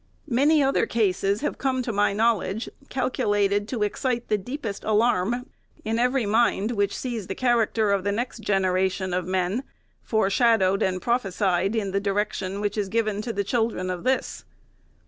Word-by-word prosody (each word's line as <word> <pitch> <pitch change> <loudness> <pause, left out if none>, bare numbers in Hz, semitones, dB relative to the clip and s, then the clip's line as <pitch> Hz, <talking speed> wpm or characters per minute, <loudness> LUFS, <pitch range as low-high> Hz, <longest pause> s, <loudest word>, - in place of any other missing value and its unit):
Many 290 +5 +4
other 270 0 +2
cases 200 -1 +1
have 300 - -3
come 260 -1 0
to 235 - -3
my 205 0 +2
knowl 220 0 +2
edge, 215 +5 -4 0.2
calculated 205 -5 0
to 225 -3 -2
excite 240 +3 -2
the 210 - +3
deepest 230 -1 -5
alarm 225 +2 +1 0.4
in 225 +1 0
every 250 0 +2
mind 220 0 +2
which 205 -3 0
sees 235 -7 -4
the 190 - -4
character 230 -4 +2
of 200 -2 +1
the 200 - 0
next 235 +3 -3
generation 190 -2 0
of 180 -1 -1
men 185 +6 0 0.4
foreshadowed 220 -2 +2
and 185 -1 0
prophesied 195 -4 0
in 200 -3 -1
the 195 - +1
direction 200 -1 -2
which 205 0 -1
is 200 -2 -2
given 215 -1 0
to 230 +2 -3
the 200 -2 -1
children 220 -4 -1
of 180 -1 -5
this. 260 +1 -1
210 Hz, 165 wpm, -25 LUFS, 195-235 Hz, 0.4 s, Many